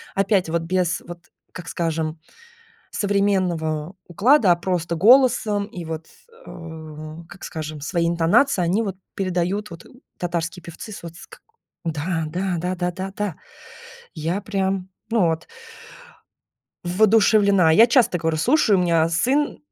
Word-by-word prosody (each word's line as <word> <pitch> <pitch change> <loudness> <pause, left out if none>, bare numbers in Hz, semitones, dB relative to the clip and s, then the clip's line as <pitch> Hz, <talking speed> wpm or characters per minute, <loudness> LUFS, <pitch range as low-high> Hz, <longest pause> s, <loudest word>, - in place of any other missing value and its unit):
опять 195 -3 +1
вот 165 0 -1
без 180 0 0
вот, 175 0 -11 0.3
как 175 -2 -8
скажем, 160 -1 -2 0.7
современного 185 -5 0
уклада, 205 - +4
а 170 - +2
просто 170 -1 -2
голосом 220 0 +4
и 200 -5 -8
вот, 160 0 -6 0.4
м, 160 -1 -9
как 180 - -14
скажем, 155 -2 -6
свои 170 +3 -1
интонации 170 +7 +3
они 185 +6 +1
вот 195 -4 -4 0.2
передают 185 +2 -1
вот 165 -1 -11 0.3
татарские 170 0 -3
певцы 170 +6 -9
с - - -9
вот 170 -1 -9
ск - - -14 0.4
Да 165 +1 -2
да 180 +3 -2
да-да 180 0 -2
да 190 +2 -6
да, 205 -5 -2 0.8
я 165 +5 -2
прям, 190 -2 -2 0.2
ну, 220 -7 +3
вот 160 0 -2 1.4
воодушевлена. 200 -1 +4
Я 225 +8 +7
часто 235 -7 +3
говорю, 160 0 -1
слушаю, 220 - +3
у - - +2
меня 165 -2 +2
сын, 265 - +1
175 Hz, 135 wpm, -22 LUFS, 165-200 Hz, 1.4 s, Я